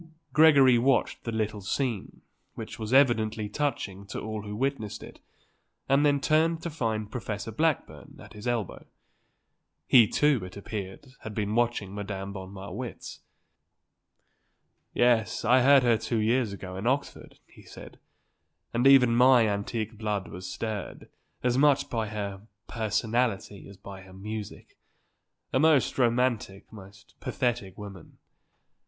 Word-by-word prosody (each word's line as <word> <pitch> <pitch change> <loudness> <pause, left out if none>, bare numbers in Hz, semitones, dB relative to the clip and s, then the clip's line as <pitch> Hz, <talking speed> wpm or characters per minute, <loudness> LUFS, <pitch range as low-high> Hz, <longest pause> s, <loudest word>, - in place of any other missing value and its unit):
Gregory 140 -6 +6
watched 130 0 +1
the 115 - -2
little 110 -2 -2
scene, 115 +1 -3 0.3
which - - -8
was 110 0 -5
evidently 115 -5 +3
touching 105 -6 -3
to - - -5
all 110 -1 -5
who 105 0 -7
witnessed 125 -3 -3
it, - - -12 0.7
and 135 +2 +3
then 145 -1 +3
turned 160 +3 +2
to 170 - -4
find 110 -7 -3
Professor 110 -2 -5
Blackburn 155 +7 -2
at - - -13
his 105 +3 -8
elbow. 115 -5 -2 1.0
He, 120 -5 +6
too, 140 -2 +2
it 90 +2 -9
appeared, 100 +5 -7
had 110 -1 -8
been 105 -1 -2
watching 120 -4 0
Madame 100 -1 -5
von 95 -1 -8
Marwitz. 100 +5 -8 1.7
"Yes; 120 -2 +1
I 125 +3 +5
heard 135 +1 +6
her 115 -3 +3
two 115 +1 -2
years 115 +1 +1
ago 95 -2 -8
in 100 +5 -3
Oxford," 140 +3 -2
he - - -18
said; - - -13 0.7
"and 120 +3 +3
even 125 -4 +6
my 125 -1 +6
antique 110 +2 -3
blood 105 -3 -2
was 90 +1 -7
stirred, 110 -4 -5 0.3
as 125 +1 +1
much 145 -1 +3
by 115 -2 -1
her 100 -2 -5 0.3
personality 110 -2 -2
as 100 - -13
by 95 0 -10
her 95 0 -15
music. 105 +2 -8 0.7
A 130 - +3
most 155 -3 +3
romantic, 120 -5 0
most 100 -1 -14
pathetic 120 -7 -2
woman. 100 -4 -11
110 Hz, 140 wpm, -27 LUFS, 100-130 Hz, 1.7 s, Gregory